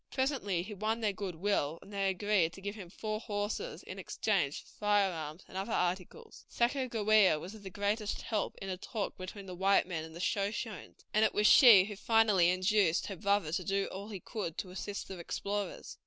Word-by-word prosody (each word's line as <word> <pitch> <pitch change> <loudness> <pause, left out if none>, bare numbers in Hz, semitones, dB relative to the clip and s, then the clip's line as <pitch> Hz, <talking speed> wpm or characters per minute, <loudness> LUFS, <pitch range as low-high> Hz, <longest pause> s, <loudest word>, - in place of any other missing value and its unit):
Presently 260 - 0
he 210 +3 -7
won 215 +3 -1
their 210 -2 +1
good 195 -3 -5
will, 165 -4 0
and 205 - -14
they 195 -1 +1
agreed 190 -3 +1
to 195 - -11
give 200 +1 -4
him 195 -5 -9
four 215 +3 -4
horses 215 - -4
in - - -8
exchange - - -1
for - - -20
firearms 190 -6 0
and - - -14
other 195 +4 -3
articles. 185 - -3
Sacajawea 220 - +3
was 185 +6 -8
of 220 - -11
the 195 - -7
greatest 205 +2 -2
help 215 -2 -2
in 195 - -6
the 185 - -3
talk 205 +2 -4
between 190 +2 -8
the 185 - -7
white 195 +2 +3
men 165 -4 -3
and 160 0 -10
the - - -8
Shoshones, 205 +2 -3
and 215 - +4
it 220 - +2
was 210 - +2
she 220 -5 +9
who 210 0 -6
finally 210 -4 +4
induced 185 -1 +2
her 195 - -5
brother 200 -4 +1
to 180 - -1
do 195 +1 0
all 200 +2 -6
he 200 -3 -6
could 190 -6 -5
to 185 - -5
assist 200 +2 -5
the 190 -2 -7
explorers. 200 +4 -4
200 Hz, 205 wpm, -32 LUFS, 185-215 Hz, -, she